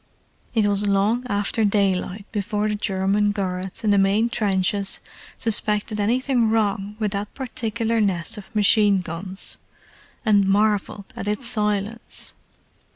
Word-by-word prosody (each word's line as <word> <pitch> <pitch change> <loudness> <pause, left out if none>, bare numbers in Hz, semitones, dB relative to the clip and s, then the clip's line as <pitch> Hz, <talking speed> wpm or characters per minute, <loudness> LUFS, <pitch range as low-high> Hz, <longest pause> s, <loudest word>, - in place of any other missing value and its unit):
It 220 -2 +3
was 205 0 +2
long 205 +5 +2
after 205 +2 0
daylight 200 -1 0
before 210 0 -1
the 210 - 0
German 205 0 +1
guards 190 0 -3
in 215 - +3
the 200 - +4
main 200 +4 +3
trenches 200 -2 +1 0.4
suspected 210 -1 0
anything 240 +2 +2
wrong 210 -2 0
with 215 -2 -1
that 200 +1 -4
particular 230 -3 -1
nest 185 -4 0
of 210 +2 -11
machine 205 -2 +4
guns, 185 +3 -3 0.7
and 205 -3 +4
marvelled 205 0 +1
at 205 - -5
its 210 +5 -1
silence. 210 -1 -1
205 Hz, 130 wpm, -23 LUFS, 195-220 Hz, 0.7 s, the